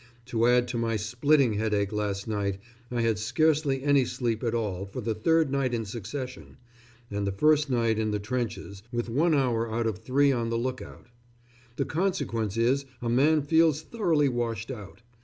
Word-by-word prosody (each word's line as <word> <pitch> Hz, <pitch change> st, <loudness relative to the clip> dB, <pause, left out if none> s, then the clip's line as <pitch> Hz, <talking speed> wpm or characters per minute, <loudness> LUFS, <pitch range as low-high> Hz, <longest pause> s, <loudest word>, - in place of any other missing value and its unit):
To 120 Hz, -2 st, +1 dB
add 125 Hz, 0 st, +4 dB
to 120 Hz, -1 st, -2 dB
my 115 Hz, -1 st, 0 dB
splitting 125 Hz, +4 st, +2 dB
headache 105 Hz, -1 st, 0 dB
last 105 Hz, -1 st, -2 dB
night, 100 Hz, -3 st, -1 dB, 0.3 s
I 120 Hz, -1 st, -1 dB
had 115 Hz, -2 st, +1 dB
scarcely 140 Hz, +3 st, +1 dB
any 140 Hz, -2 st, +4 dB
sleep 120 Hz, -2 st, -2 dB
at 115 Hz, -1 st, 0 dB
all 100 Hz, -4 st, -2 dB
for 100 Hz, -, -7 dB
the 115 Hz, -1 st, -1 dB
third 160 Hz, +7 st, +2 dB
night 135 Hz, -3 st, 0 dB
in 115 Hz, -1 st, -3 dB
succession 125 Hz, +5 st, -7 dB, 0.5 s
and 100 Hz, 0 st, -2 dB
the -, -, 0 dB
first 150 Hz, +8 st, +3 dB
night 115 Hz, -3 st, +1 dB
in 110 Hz, -1 st, 0 dB
the 105 Hz, -, 0 dB
trenches, 105 Hz, -2 st, -4 dB
with 120 Hz, 0 st, -2 dB
one 155 Hz, +6 st, +3 dB
hour 115 Hz, -4 st, +1 dB
out 115 Hz, +1 st, -1 dB
of 110 Hz, -2 st, -2 dB
three 140 Hz, +5 st, +2 dB
on 120 Hz, -3 st, -1 dB
the 115 Hz, -, 0 dB
look 125 Hz, +2 st, -2 dB
out. -, -, -12 dB, 0.7 s
The -, -, -1 dB
consequence 130 Hz, -, -1 dB
is 130 Hz, +4 st, +2 dB
a 120 Hz, -, -3 dB
man 145 Hz, +5 st, +3 dB
feels 160 Hz, 0 st, +3 dB
thoroughly 165 Hz, -10 st, +1 dB
washed 120 Hz, -2 st, -2 dB
out. 110 Hz, -1 st, -10 dB
120 Hz, 185 wpm, -27 LUFS, 110-140 Hz, 0.7 s, add